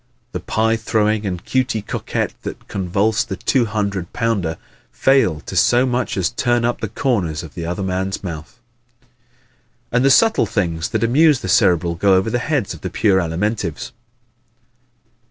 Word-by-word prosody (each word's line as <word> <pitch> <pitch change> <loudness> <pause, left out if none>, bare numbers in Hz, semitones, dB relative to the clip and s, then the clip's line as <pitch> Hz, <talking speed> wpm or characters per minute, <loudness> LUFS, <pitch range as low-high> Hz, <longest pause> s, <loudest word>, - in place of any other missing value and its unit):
The - - -4
pie 115 +1 0
throwing 110 -1 0
and 90 -2 -4
Cutey 125 -5 0
Coquette - - -3
that - - -8
convulse 100 +3 0
the 95 - -5
two 125 +5 +1
hundred 100 -4 -3
pounder 100 -9 -1 0.3
fail 130 - +2
to - - -8
so 120 +2 +4
much 125 -4 -1
as 90 -3 0
turn 120 0 +1
up 120 - -1
the 110 - -1
corners 95 - -1
of 80 - -10
the 85 -2 -5
other 90 +3 -3
man's 95 +1 -2
mouth. 85 +5 -7 1.3
And 125 +1 +2
the 135 - +5
subtle 225 +10 +4
things 85 -5 -1
that - - -1
amuse 145 +4 +4
the - - -5
Cerebral 85 -1 +3
go 95 +3 +3
over 95 +4 +1
the 120 - 0
heads 130 -6 -1
of 80 - -12
the 95 - -4
pure 95 +1 +2
Alimentives. 90 +3 -2
105 Hz, 165 wpm, -19 LUFS, 90-120 Hz, 1.3 s, the